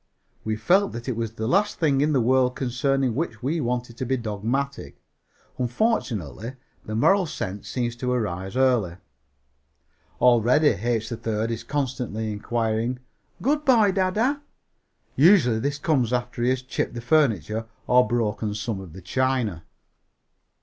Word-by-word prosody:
We 110 0 -1
felt 185 - +2
that 120 +2 -7
it 130 - -1
was 115 -1 -3
the 110 -1 -4
last 200 - +2
thing 140 -4 +2
in 150 +1 +2
the 140 - +3
world 125 +1 +2
concerning 130 0 0
which 125 -4 -3
we 155 +5 0
wanted 120 -1 -3
to 130 - -3
be 130 +1 +1
dogmatic. 115 - -3 0.6
Unfortunately, 120 - -1 0.3
the 110 - -5
moral 190 - +3
sense 100 -8 -5
seems 120 -2 -2
to 125 +1 -2
arise 95 -4 -2
early. 125 -10 +2 1.2
Already 125 +5 +5
H. 115 +2 0
3rd 115 -1 -3
is 115 - -4
constantly 125 -6 -3
inquiring 115 +3 -1 0.5
"Good 295 +4 +1
boy, 225 -7 +5
dada?" 210 +9 +1 0.8
Usually 140 - +5
this 140 +4 -1
comes 140 -6 +1
after 120 -1 -2
he 120 - +2
has 130 0 0
chipped 130 -1 -3
the 120 - -4
furniture 115 - +1 0.2
or 125 -2 +4
broken 110 -2 -1
some 105 0 -3
of 90 -5 -11
the 95 0 -11
china. 120 -5 -1
120 Hz, 145 wpm, -24 LUFS, 110-135 Hz, 1.2 s, Already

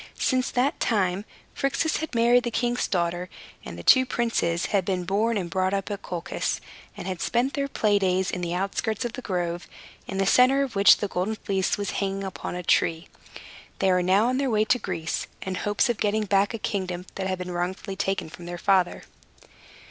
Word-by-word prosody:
Since 255 -1 +1
that 255 +3 0
time, 195 -3 +1 0.3
Phrixus 275 +3 0
had 315 -5 -5
married 240 +1 +4
the 240 - -1
king's 240 +1 0
daughter; 175 -1 -1 0.3
and - - -8
the - - -8
two 260 - +7
young 260 - 0
princes 205 -9 0
had 195 -2 +3
been 185 -1 -1
born 215 +5 +1
and 185 -3 -2
brought 185 +2 0
up 195 +1 -3
at 200 - -4
Colchis, 175 -1 -3 0.4
and - - -6
had 185 -2 -4
spent 245 +3 +1
their 280 -1 -1
play 210 -6 +2
days 185 -1 +1
in 180 - -3
the 175 0 -2
outskirts 200 +5 -1
of 235 - -3
the 255 - -6
grove, 175 -4 -3 0.4
in 195 - -4
the 195 - +2
center 255 +7 +5
of 260 -6 -5
which 200 0 +7
the 205 - -2
Golden 190 +4 -2
Fleece 195 -2 -1
was 205 -1 -2
hanging 195 0 -2
upon 190 -2 -5
a 180 - -4
tree. 165 0 +1 0.7
They 190 -1 +2
were 180 0 +3
now 190 +4 +3
on 255 +1 0
their 275 -1 +1
way 215 -2 +2
to 250 +3 +2
Greece, 170 -6 -3 0.2
in 190 - -3
hopes 205 +6 +1
of 240 -4 -1
getting 210 +1 +1
back 200 +2 +2
a - - -3
kingdom 185 -4 -3
that 190 -1 -3
had 185 0 -1
been 180 0 -5
wrongfully 185 +3 -3
taken 195 -3 -1
from 170 +2 -11
their 175 0 -5
father. 190 -1 +2
195 Hz, 210 wpm, -25 LUFS, 180-230 Hz, 0.7 s, two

